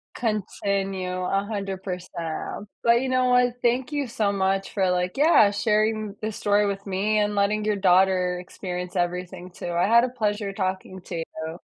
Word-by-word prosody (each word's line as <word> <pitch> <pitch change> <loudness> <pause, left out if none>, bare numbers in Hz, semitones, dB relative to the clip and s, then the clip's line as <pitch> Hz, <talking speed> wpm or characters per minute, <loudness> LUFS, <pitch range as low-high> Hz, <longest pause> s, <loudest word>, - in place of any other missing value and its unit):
Continue 195 -4 -2
100%. 195 -2 -4 0.2
But 235 +1 +4
you 265 - -2
know 255 0 +2
what, 250 -1 +4
thank 250 +4 +1
you 290 -3 -1
so 215 -3 0
much 195 0 0
for, 190 -3 +1
like, 180 +4 -1
yeah, 285 -9 +6
sharing 215 0 0
this 215 -1 -3
story 205 0 +2
with 200 0 -3
me 200 +3 0
and 205 0 0
letting 210 +1 +1
your 215 0 +1
daughter 185 -1 +3
experience 180 0 -6
everything 180 +1 -3
too. 175 - -6
I 175 +3 +2
had 235 +2 +6
a 250 - 0
pleasure 210 -4 -2
talking 190 -1 -3
to 175 -1 -6
you 165 - -2 0.2
though. 165 +3 -7
200 Hz, 170 wpm, -25 LUFS, 185-215 Hz, 0.2 s, yeah